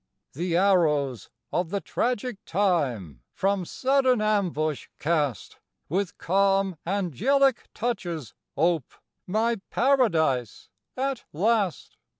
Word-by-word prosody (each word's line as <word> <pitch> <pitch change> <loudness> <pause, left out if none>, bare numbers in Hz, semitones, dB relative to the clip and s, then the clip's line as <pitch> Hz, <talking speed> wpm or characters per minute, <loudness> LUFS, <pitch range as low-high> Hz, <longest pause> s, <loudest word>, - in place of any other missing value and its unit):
The 170 +3 -1
arrows 150 - +2 0.2
of 175 -2 0
the 200 +2 -1
tragic 245 0 -2
time 135 - 0
From 195 -1 0
sudden 260 +2 +2
ambush 180 -9 0
cast, 150 -6 -1 0.3
With 185 +3 -1
calm 195 0 +2
angelic 220 - +1
touches 175 - -3 0.2
ope 165 -3 +1 0.3
My 220 +2 0
Paradise 165 - +1 0.3
at 270 -1 -2
last! 200 +1 0
190 Hz, 95 wpm, -26 LUFS, 155-220 Hz, 0.3 s, arrows